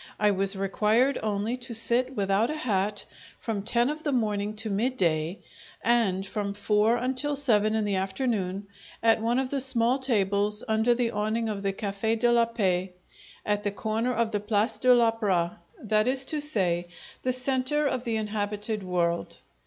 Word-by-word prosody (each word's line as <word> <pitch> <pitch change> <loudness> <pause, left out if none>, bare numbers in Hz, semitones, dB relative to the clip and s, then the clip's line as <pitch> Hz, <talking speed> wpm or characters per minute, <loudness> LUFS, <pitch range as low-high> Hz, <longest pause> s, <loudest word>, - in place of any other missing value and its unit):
I 210 -1 +4
was 195 0 +1
required 215 +7 +1
only 215 +2 -1
to 240 -2 -6
sit 250 +3 +2
without 200 +2 +1
a 305 - -2
hat 205 -6 -1 0.3
from 220 -4 -3
ten 235 +3 +1
of 305 +2 -3
the 300 - -1
morning 210 -4 -1
to 220 +1 -3
midday, 190 -7 0 0.5
and 215 -5 +2
from 200 0 -3
four 210 +3 +2
until 260 +4 -1
seven 220 -6 +3
in 220 -1 0
the 200 -2 0
afternoon, 195 -1 -2 0.4
at 225 -1 +4
one 235 +2 +1
of 265 -1 -1
the 280 - 0
small 255 -1 +2
tables 210 -4 +1
under 220 +2 +2
the 235 -1 0
awning 215 +2 -1
of 205 -2 -4
the 200 0 0
Cafe' 200 +3 -2
de 240 +1 +2
la 235 -1 +4
Paix 190 -5 -1 0.5
at 205 0 0
the 205 - +1
corner 220 +4 -2
of 235 -2 0
the 205 - 0
Place 210 +2 0
de 255 - +4
l'Opera 220 -8 +2 0.2
that 215 +1 +1
is 265 +1 +1
to 305 +1 0
say, 180 - 0 0.3
the 255 - 0
centre 260 +3 +1
of 255 -3 -1
the 230 -3 -2
inhabited 210 0 -3
world. 175 -2 -1
220 Hz, 175 wpm, -27 LUFS, 200-240 Hz, 0.5 s, I